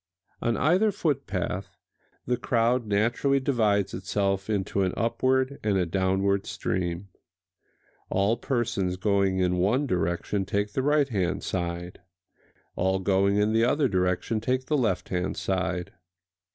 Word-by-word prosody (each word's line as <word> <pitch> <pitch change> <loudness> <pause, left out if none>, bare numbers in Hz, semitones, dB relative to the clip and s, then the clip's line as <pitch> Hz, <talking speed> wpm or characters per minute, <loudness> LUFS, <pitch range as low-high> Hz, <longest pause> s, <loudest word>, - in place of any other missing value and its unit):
On 115 - 0
either 185 +9 +3
footpath 100 - -2 0.5
the 125 - +1
crowd 120 0 +1
naturally 120 +7 +2
divides 110 -7 +1
itself 95 +2 -1
into 100 -1 0
an 95 -1 0
upward 130 +4 +1
and 105 -2 +1
a 90 - +2
downward 95 +2 0
stream. 90 +1 -3 1.0
All 100 +4 +2
persons 120 -7 -1
going 100 -1 +1
in 90 -1 +1
one 110 +11 +2
direction 90 -1 -1
take 100 +2 -2
the 130 - 0
right 145 0 +2
hand 95 -5 -1
side; 85 -1 -4 0.8
all 95 +1 +1
going 95 +1 +2
in 105 +1 +2
the 115 +1 +3
other 140 +4 +3
direction 95 +2 0
take 130 +3 -1
the 150 - 0
left 110 -10 0
hand 90 0 -2
side. 90 -2 -2
100 Hz, 135 wpm, -26 LUFS, 95-120 Hz, 1.0 s, either